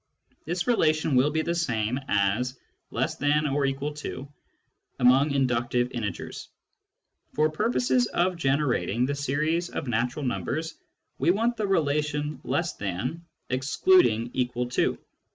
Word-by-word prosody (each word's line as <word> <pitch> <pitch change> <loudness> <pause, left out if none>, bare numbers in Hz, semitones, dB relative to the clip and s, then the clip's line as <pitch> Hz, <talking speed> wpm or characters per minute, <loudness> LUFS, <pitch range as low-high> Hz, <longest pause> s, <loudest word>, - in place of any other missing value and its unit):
This 175 +2 -1
relation 155 - +2
will 130 +4 +4
be 160 +1 0
the 170 - -1
same 125 -7 -1
as 105 +6 +1 0.2
" - - -49
less - - -2
than 145 +2 +2
or 140 -1 +1
equal 140 +2 -2
to 145 -2 -6 0.4
" - - -48
among 130 +4 +5
inductive 125 -2 +1
integers. 105 -7 -5 0.9
For 155 0 +2
purposes 125 -3 +1
of 180 +1 0
generating 135 - +1
the 140 - -1
series 155 +5 -1
of - - -5
natural 125 +5 -1
numbers, 135 - -2 0.5
we - - +2
want 230 +6 +2
the 215 -3 -2
relation 150 -4 0
" - - -33
less 170 0 0
than," 105 - -4 0.3
excluding 130 - +3
" - - -27
equal 125 -1 -1
to." 125 - +1
140 Hz, 145 wpm, -26 LUFS, 125-155 Hz, 0.9 s, among